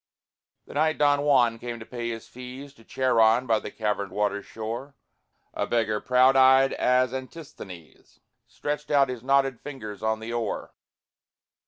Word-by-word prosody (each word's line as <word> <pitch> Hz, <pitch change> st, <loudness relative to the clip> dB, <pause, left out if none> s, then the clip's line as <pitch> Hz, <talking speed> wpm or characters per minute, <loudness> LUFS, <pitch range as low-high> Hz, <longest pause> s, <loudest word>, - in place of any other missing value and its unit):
The -, -, -12 dB
night 155 Hz, +2 st, +1 dB
Don 145 Hz, -1 st, +3 dB
Juan 125 Hz, -6 st, +3 dB
came 120 Hz, 0 st, -6 dB
to 110 Hz, -, -9 dB
pay 120 Hz, -1 st, -5 dB
his 115 Hz, -1 st, -6 dB
fees 130 Hz, +3 st, -10 dB
To 115 Hz, -, -20 dB
Charon, 120 Hz, -1 st, +3 dB
by 115 Hz, -3 st, +2 dB
the -, -, -7 dB
caverned 105 Hz, -3 st, -2 dB
water's 105 Hz, -1 st, -1 dB
shore, 115 Hz, +6 st, -6 dB, 0.6 s
A -, -, -2 dB
beggar, 110 Hz, -3 st, 0 dB
proud 130 Hz, +1 st, +4 dB
eyed 130 Hz, 0 st, +6 dB
as 125 Hz, 0 st, +2 dB
Antisthenes, 130 Hz, -, -10 dB, 0.3 s
Stretched 150 Hz, 0 st, -5 dB
out 140 Hz, -2 st, +4 dB
his 125 Hz, -2 st, -5 dB
knotted 135 Hz, -1 st, +2 dB
fingers 110 Hz, -8 st, -8 dB
on 110 Hz, 0 st, 0 dB
the 115 Hz, +1 st, -6 dB
oar. 115 Hz, -3 st, -3 dB
125 Hz, 155 wpm, -26 LUFS, 110-135 Hz, 0.6 s, eyed